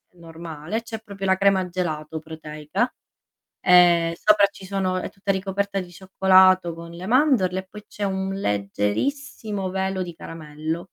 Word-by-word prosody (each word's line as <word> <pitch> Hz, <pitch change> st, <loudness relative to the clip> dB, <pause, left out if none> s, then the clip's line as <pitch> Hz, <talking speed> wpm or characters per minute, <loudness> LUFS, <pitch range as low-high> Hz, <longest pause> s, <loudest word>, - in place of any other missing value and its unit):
normale, 165 Hz, +4 st, -6 dB
c'è 225 Hz, -1 st, -6 dB
proprio 200 Hz, -3 st, -7 dB
la 190 Hz, 0 st, +3 dB
crema 195 Hz, -2 st, +3 dB
gelato 160 Hz, -3 st, -3 dB
proteica 155 Hz, -, -3 dB, 0.8 s
e 175 Hz, -2 st, +6 dB
sopra 210 Hz, -1 st, +6 dB
ci 195 Hz, -1 st, -13 dB
sono 185 Hz, -1 st, -1 dB
è -, -, -3 dB
tutta 195 Hz, 0 st, -2 dB
ricoperta 195 Hz, +1 st, -2 dB
di 180 Hz, -1 st, -7 dB
cioccolato 185 Hz, -1 st, +4 dB
con 170 Hz, 0 st, -10 dB
le 175 Hz, +2 st, -8 dB
mandorle 230 Hz, -7 st, +3 dB
e -, -, -6 dB
poi 210 Hz, 0 st, -11 dB
c'è 205 Hz, -, -7 dB
un 190 Hz, 0 st, -1 dB
leggerissimo 195 Hz, -, -2 dB
velo 190 Hz, 0 st, -1 dB
di 175 Hz, -1 st, -7 dB
caramello. 160 Hz, 0 st, -6 dB
185 Hz, 150 wpm, -23 LUFS, 165-195 Hz, 0.8 s, e